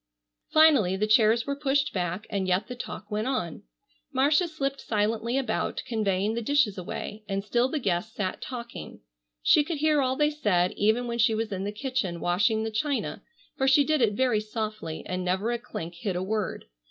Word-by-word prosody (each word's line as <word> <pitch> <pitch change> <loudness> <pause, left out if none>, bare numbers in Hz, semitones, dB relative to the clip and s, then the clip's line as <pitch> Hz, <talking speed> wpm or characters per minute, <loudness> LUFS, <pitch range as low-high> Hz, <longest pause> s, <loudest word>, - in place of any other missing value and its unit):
Finally 290 - +5
the 210 - +1
chairs 220 +1 +4
were 280 - -2
pushed 280 0 0
back, 180 +2 -2
and 195 -2 -1
yet 185 +2 +1
the 250 - -5
talk 215 -3 -8
went 215 +3 -1
on. 175 -12 -2 0.5
Marcia 290 +6 +3
slipped 275 -4 -3
silently 220 +3 0
about 250 -5 -1
conveying 210 -2 0
the 235 - -2
dishes 245 -4 +2
away. 205 +3 -6
And 195 0 -1
still 240 +4 +2
the 310 - -1
guests 210 -2 -1
sat 190 -3 -3
talking. 235 - -7 0.4
She 295 - +6
could 325 +1 -3
hear 305 0 +3
all 260 0 +1
they 295 +2 +2
said 185 -11 +1
even 220 +4 +1
when 235 0 -3
she 225 -1 +4
was 220 -1 -2
in 195 0 -3
the 205 - -2
kitchen 210 -6 -2
washing 210 +6 +1
the 225 - -3
china, 275 +6 -2 0.3
for 265 - 0
she 275 +2 +6
did 310 0 +1
it 220 -3 +3
very 245 -1 +2
softly 215 -6 -5
and 185 0 -3
never 190 +6 0
a 240 - -1
clink 170 -8 -7
hid 185 +2 -3
a 180 - -1
word. 210 0 -2
220 Hz, 195 wpm, -27 LUFS, 200-265 Hz, 0.5 s, She